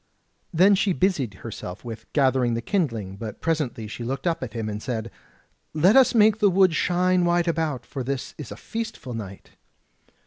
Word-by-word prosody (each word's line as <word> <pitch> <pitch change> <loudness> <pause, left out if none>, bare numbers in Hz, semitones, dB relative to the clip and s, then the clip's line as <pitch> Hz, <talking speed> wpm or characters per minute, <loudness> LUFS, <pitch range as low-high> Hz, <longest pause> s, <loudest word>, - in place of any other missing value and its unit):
Then 185 +4 +5
she 195 0 +2
busied 160 - 0
herself 100 -1 -8
with 115 -2 -8
gathering 130 -4 +2
the 115 - -2
kindling; 115 - -1
but 110 0 -7
presently 150 -9 -1
she 115 +3 -7
looked 130 +3 -4
up 170 -2 0
at 125 -5 -5
him, 115 -2 -3
and 105 0 -4
said: 115 -3 -4 0.6
"Let 180 +7 +5
us 265 -2 +6
make 215 -1 +5
the 205 -2 +5
wood 190 -2 +4
shine 180 +2 +2
wide 175 0 +2
about, 155 -7 -1
for 135 -3 -5
this 135 0 -4
is 150 - -7
a - - -6
feastful 220 - -6
night." 100 -3 -8
140 Hz, 180 wpm, -24 LUFS, 115-180 Hz, 0.6 s, us